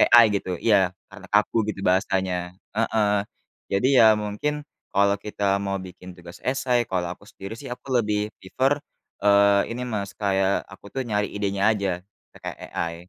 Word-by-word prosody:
AI 120 -1 +10
gitu. 90 -1 -4
Iya 95 -2 +3 0.2
karena - - -12
kaku 105 +2 +2
gitu 100 -2 -4
bahasanya. 90 -1 0 0.2
Heeh. 110 -1 +1 0.6
Jadi 100 +6 +2
ya 110 -1 +8
mungkin 105 +9 -2 0.3
kalau 100 +1 +3
kita 105 -1 -5 0.2
mau 100 0 -1
bikin 95 -1 -10
tugas 85 +1 -12
essay, 130 -2 +1
kalau 90 -2 -1
aku 100 - -20
sendiri 95 +3 -8
sih - - -8
aku 125 +2 -6
lebih 105 0 -1
prefer 130 +9 +1 0.5
eee, 100 0 +5
ini 125 +2 -4
Mas, 100 -4 -4
kayak 95 -1 +1
aku 95 +1 -13
tuh 135 +2 -3
nyari 105 -2 0
idenya 100 0 +1
aja 100 -5 0 0.3
pakai - - -7 0.2
AI. 85 0 -2
100 Hz, 160 wpm, -24 LUFS, 95-110 Hz, 0.6 s, AI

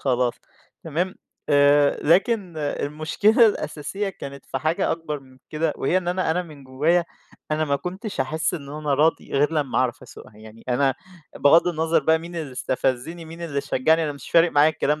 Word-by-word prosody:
خلاص، 125 -2 +1 0.5
تمام، 170 +4 -2 0.3
آآ، 145 0 +4
لكن 185 +1 +2
المشكلة 155 +10 +2
الأساسية 195 0 -3
كانت 140 -7 -9
في 135 - -3
حاجة 155 +4 0
أكبر 150 -3 -5
من 130 -1 -19
كده، 155 0 0
وهي 180 +7 +1
إن 175 - -5
أنا 180 -2 0
أنا 180 +3 0
من 150 -5 -13
جوايا، 155 +7 +1 0.5
أنا 155 +1 +1
ما 140 -1 0
كُنتش 190 - -5
هاحس 160 +6 -1
إنه 145 -2 -7
أنا 150 -2 0
راضي، 155 +4 +1
غير 145 +3 +2
لما 145 -5 0
أعرف 125 -3 -1
أَسُوقها 105 - -14
يعني، 110 +1 -14
أنا 135 +2 +2 0.4
بغض 165 +5 +5
النظر 160 -1 +1
بقى 160 +2 +4
مين 170 +1 -9
اللي 150 -5 -5
استفزني، 130 +6 -2
مين 165 +1 -10
اللي 145 -4 -2
شجعني، 155 +4 +2
أنا 150 - -2
مش 140 - -11
فارق 165 0 +5
معايّا 150 +2 +5
الكلام 150 -1 -1
155 Hz, 180 wpm, -23 LUFS, 140-170 Hz, 0.5 s, بغض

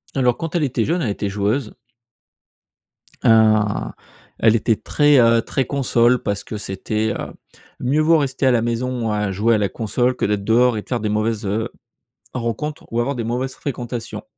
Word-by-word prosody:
Alors, 125 -3 +2
quand 165 +1 -5
elle 165 - +2
était 125 -5 0
jeune, 170 +3 0
elle 115 - -1
était 100 0 -3
joueuse 105 +4 -1 1.5
hein, 110 - +3 0.5
elle 115 0 +4
était 110 0 +2
très, 145 +4 +3
heu, 115 -1 +5
très 135 +3 -2
console 125 -3 +2
parce 100 -1 -2
que 110 - -6
c'était, 105 +2 -2
heu: - - -6 0.5
«mieux 140 +5 +1
vaut 160 +1 +5
rester 135 -2 -1
à 130 - +5
la 120 -2 +2
maison 120 -1 -2
à 105 -2 -1
jouer 110 +4 +2
à - - +2
la 100 -2 0
console 120 +4 -1
que - - -1
d'être 105 -1 -1
dehors 120 +2 +3
et 105 - -2
de - - -21
faire 120 -2 -1
des 105 - -1
mauvaises 110 0 -1
heu 110 +3 -1 0.6
rencontres 125 +5 -4
ou 115 - -1
avoir 135 +4 0
des 120 - -3
mauvaises 125 +3 -2
fréquentations», 120 -4 -5
115 Hz, 190 wpm, -20 LUFS, 110-130 Hz, 1.5 s, heu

